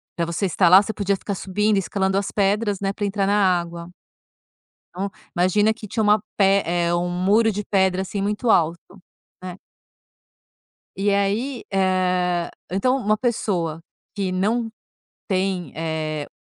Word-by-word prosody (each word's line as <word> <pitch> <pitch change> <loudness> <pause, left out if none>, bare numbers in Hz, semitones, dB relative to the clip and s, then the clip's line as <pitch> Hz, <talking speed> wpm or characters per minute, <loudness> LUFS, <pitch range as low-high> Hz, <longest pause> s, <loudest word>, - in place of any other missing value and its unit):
pra 170 - -1
você 170 +4 -2
estar 180 +1 +2
lá, 190 +2 +9
você 215 +1 -4
podia 200 -1 0
ficar 200 +1 -5
subindo, 210 +3 0
escalando 190 0 0
as 200 - -2
pedras, 205 0 0
né, 195 -1 -1
pra 205 +1 -3
entrar 195 -1 -1
na 205 - +2 0.2
água. 170 0 -7 1.1
Então, 195 +2 -3 0.3
imagina 205 +5 +3
que 220 -2 -10
tinha 220 +2 -1
uma 210 0 +4 0.2
pe 195 0 +4
eh, 170 0 0
um 175 +1 0
muro 200 +6 +2
de 210 +1 -4
pedra, 190 -2 +1
assim, 195 +1 -4
muito 210 +4 -1
alto, 170 -3 +3 0.6
né. 180 0 -7 1.4
E 200 +1 +1
aí, 215 +6 -1
eh, 185 -2 +1 0.2
então 255 +8 +1
uma 215 -3 +1
pessoa 180 -9 -1 0.3
que 195 -2 -2
não 225 +5 0 0.6
tem, 185 - -1
eh, 155 -2 -3
195 Hz, 150 wpm, -22 LUFS, 180-210 Hz, 1.4 s, lá